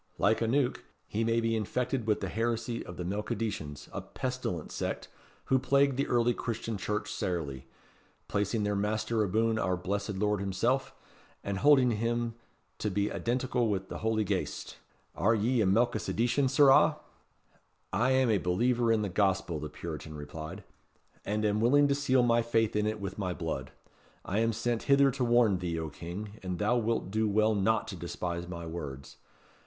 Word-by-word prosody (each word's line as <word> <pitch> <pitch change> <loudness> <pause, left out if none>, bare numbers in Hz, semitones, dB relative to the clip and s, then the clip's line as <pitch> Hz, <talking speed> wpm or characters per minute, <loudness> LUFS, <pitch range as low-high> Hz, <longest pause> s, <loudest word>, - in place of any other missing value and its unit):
Like 110 - +2
aneuch, 125 +3 +1 0.2
he 110 +2 -2
may 115 +1 +2
be 115 0 +1
infected 120 +2 -1
with 105 - +1
the 95 - -2
heresy 115 +4 -2
of 90 - -9
the 90 - -3
Melchisedecians, 100 -6 -3
a - - -3
pestilent 125 -11 -4
sect, - - -4 0.4
who 130 - +3
plagued 140 +1 +3
the 140 - 0
early 120 0 +3
Christian 115 -1 -3
Church 105 +2 -3
sairly, 70 -7 -3 0.6
placing 105 +2 0
their 105 0 0
master 110 +2 0
aboon 110 +2 +1
our 95 -3 0
Blessed 100 +3 -3
Lord 105 +1 +1
himself, 115 +8 0 0.5
and 100 -1 -2
holding 135 -2 +5
him 115 +1 -1 0.5
to 105 - -1
be 100 +1 0
identical 125 0 0
wi' 100 -2 0
the - - -5
Holy 110 -1 +1
Ghaist. - - -3 0.4
Are 110 +8 +2
ye 115 +3 +2
a 100 - +3
Melchisedecian, 120 +4 +2
sirrah?" 135 0 +6 1.0
"I 120 +7 +2
am 130 -2 +3
a 105 - +3
believer 115 +6 +2
in 110 -1 +2
the - - 0
Gospel," 95 -4 0
the 75 +1 -5
Puritan 80 -1 -7
replied. 80 +6 -7 0.6
"And 105 +2 -1
am 105 0 +1
willing 145 +5 +5
to - - +4
seal 135 -3 +2
my 120 -1 +4
faith 115 -2 +1
in 105 0 +1
it 110 0 -2
with 100 0 -5
my 90 -3 -2
blood. - - -4 0.5
I 100 +4 0
am 115 0 +2
sent 115 +1 -1
hither 140 0 +6
to 130 0 -2
warn 120 -5 +4
thee, 85 -2 -2
O 80 -1 -3
King, 100 +8 -7
and 90 -1 -3
thou 105 +5 +2
wilt 115 -4 0
do 110 +1 +1
well 110 +2 +3
not 110 +2 +1
to 100 - -5
despise 85 0 -4
my 85 -1 -6
words. 75 -5 -7
110 Hz, 175 wpm, -30 LUFS, 95-120 Hz, 1.0 s, sirrah